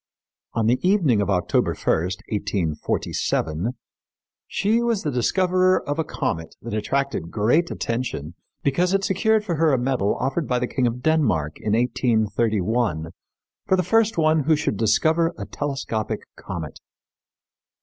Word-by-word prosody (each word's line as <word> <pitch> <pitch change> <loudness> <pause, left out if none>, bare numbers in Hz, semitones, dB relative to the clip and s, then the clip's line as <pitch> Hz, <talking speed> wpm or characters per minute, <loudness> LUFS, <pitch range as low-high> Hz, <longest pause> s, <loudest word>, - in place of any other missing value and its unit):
On 115 -2 0
the 120 +3 +3
evening 175 - +3
of 100 - -1
October 90 -3 +1
1, - - -16
1847, 90 0 -2 0.7
she 220 +4 +1
was 235 -4 0
the 150 - -1
discoverer 185 +8 +2
of 145 +2 -2
a - - +2
comet 85 - -3
that 115 -1 -7
attracted 120 -4 -1
great 120 - +2
attention 115 - -3 0.3
because 175 +7 +2
it 195 - 0
secured 210 +3 +2
for 170 -6 -1
her 160 0 +3
a 135 - +3
medal 125 -5 0
offered 135 +4 -1
by 125 - +1
the 125 - 0
King 125 0 0
of 120 +1 -4
Denmark 110 - +1
in 105 - -1
1831 110 - +1 0.6
for 190 - +4
the 185 - +1
first 225 +3 +2
one 155 -2 +3
who 160 +1 +4
should 145 -8 -1
discover 160 - +2
a - - -5
telescopic 135 -6 -3
comet. - - -7
125 Hz, 145 wpm, -23 LUFS, 105-165 Hz, 0.7 s, for